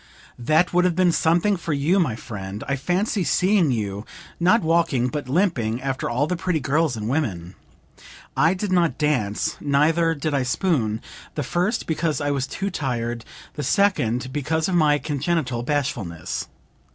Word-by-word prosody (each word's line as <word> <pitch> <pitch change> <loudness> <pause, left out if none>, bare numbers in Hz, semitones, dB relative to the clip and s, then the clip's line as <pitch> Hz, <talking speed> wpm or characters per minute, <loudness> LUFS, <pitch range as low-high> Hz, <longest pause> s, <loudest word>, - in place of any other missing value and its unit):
That 155 +9 +2
would 180 0 +4
have 180 -2 +2
been 180 -1 +4
something 170 +5 +2
for 165 -2 -3
you, 150 +7 +2
my 150 -11 +1
friend! 105 -2 -7
I 140 - 0
fancy 185 +8 0
seeing 185 -2 +3
you, 105 -4 -2 0.4
not 185 +7 +4
walking, 160 -7 +2
but 145 -1 -5
limping, 130 - +1
after 135 -1 -2
all 125 +5 +1
the 180 - -1
pretty 175 -1 -1
girls 145 -1 +1
and 105 0 -4
women! 100 - -2 0.8
I 165 +7 +3
did 195 +1 -3
not 170 -7 +2
dance, 125 -9 0
neither 160 +4 +2
did 150 +1 -2
I 140 - +2
spoon; 125 - 0 0.3
the 150 - -1
first 180 - -1
because 160 -1 -1
I 145 -1 0
was 135 -1 -1
too 195 +6 -3
tired, 120 -4 -2 0.3
the - - -5
second 130 - +1
because 155 +2 0
of 190 - -1
my 155 -4 +4
congenital 145 -4 -1
bashfulness. 120 - -2
150 Hz, 165 wpm, -23 LUFS, 125-170 Hz, 0.8 s, would